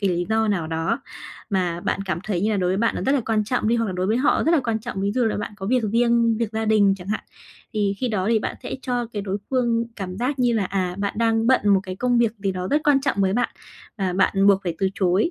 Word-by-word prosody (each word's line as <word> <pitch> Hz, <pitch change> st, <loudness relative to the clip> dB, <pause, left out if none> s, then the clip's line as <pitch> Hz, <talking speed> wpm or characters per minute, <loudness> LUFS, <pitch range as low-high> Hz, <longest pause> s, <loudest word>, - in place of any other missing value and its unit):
cái 195 Hz, -3 st, +1 dB
lý 175 Hz, 0 st, -1 dB
do 220 Hz, 0 st, +1 dB
nào 175 Hz, -6 st, 0 dB
đó, 165 Hz, -, -1 dB, 0.5 s
mà 180 Hz, -3 st, 0 dB
bạn 195 Hz, -, -1 dB
cảm 180 Hz, -3 st, -2 dB
thấy 195 Hz, -5 st, -1 dB
như 210 Hz, +3 st, +1 dB
là 210 Hz, -, +1 dB
đối 180 Hz, -2 st, +1 dB
với 190 Hz, -, +1 dB
bạn 230 Hz, +3 st, +1 dB
nó -, -, -3 dB
rất 270 Hz, -, +2 dB
là 280 Hz, -, +2 dB
quan 220 Hz, -2 st, +1 dB
trọng 235 Hz, 0 st, 0 dB
đi, 235 Hz, -, +3 dB
hoặc 230 Hz, -1 st, 0 dB
là 190 Hz, -, -3 dB
đối 180 Hz, 0 st, -1 dB
với 220 Hz, +3 st, +2 dB
họ 260 Hz, +4 st, +2 dB
rất 330 Hz, -, +4 dB
là 325 Hz, -, +4 dB
quan 225 Hz, -2 st, 0 dB
trọng, 220 Hz, -4 st, -5 dB
ví 200 Hz, +1 st, 0 dB
dụ 250 Hz, 0 st, +1 dB
là 220 Hz, -, 0 dB
bạn 210 Hz, -, -4 dB
có 195 Hz, -2 st, -6 dB
việc 250 Hz, +3 st, +2 dB
riêng, 235 Hz, -1 st, +3 dB
việc 230 Hz, -2 st, -2 dB
gia 220 Hz, 0 st, -1 dB
đình 210 Hz, -3 st, +4 dB
chẳng 180 Hz, 0 st, -11 dB
hạn. 215 Hz, -, -2 dB, 0.5 s
Thì 205 Hz, -2 st, 0 dB
khi 255 Hz, -, 0 dB
đó 200 Hz, -4 st, -1 dB
thì 230 Hz, -1 st, +3 dB
bạn -, -, -4 dB
sẽ -, -, -5 dB
cho 245 Hz, -2 st, -1 dB
cái 205 Hz, -2 st, -3 dB
đối 195 Hz, 0 st, -3 dB
phương 235 Hz, -3 st, +1 dB
cảm 185 Hz, -3 st, -5 dB
giác 255 Hz, +6 st, -2 dB
như 245 Hz, -1 st, +3 dB
là, 220 Hz, -4 st, +1 dB
à, 185 Hz, -1 st, -2 dB
bạn 200 Hz, 0 st, -2 dB
đang 225 Hz, 0 st, +2 dB
bận 260 Hz, -, +4 dB
một 195 Hz, -1 st, +5 dB
cái 185 Hz, -1 st, -6 dB
công 245 Hz, +1 st, +1 dB
việc 230 Hz, -2 st, +2 dB
gì 195 Hz, -1 st, -1 dB
đó 185 Hz, 0 st, -4 dB
rất 295 Hz, -, +3 dB
quan 285 Hz, -2 st, +4 dB
trọng 270 Hz, -5 st, -1 dB
với 190 Hz, -1 st, +2 dB
bạn, 245 Hz, +4 st, +1 dB, 0.5 s
và 185 Hz, -2 st, 0 dB
bạn 195 Hz, +1 st, +2 dB
buộc 195 Hz, -1 st, +5 dB
phải 170 Hz, -2 st, -2 dB
từ 195 Hz, -, +2 dB
chối. 190 Hz, -, +2 dB
210 Hz, 300 wpm, -23 LUFS, 190-235 Hz, 0.5 s, một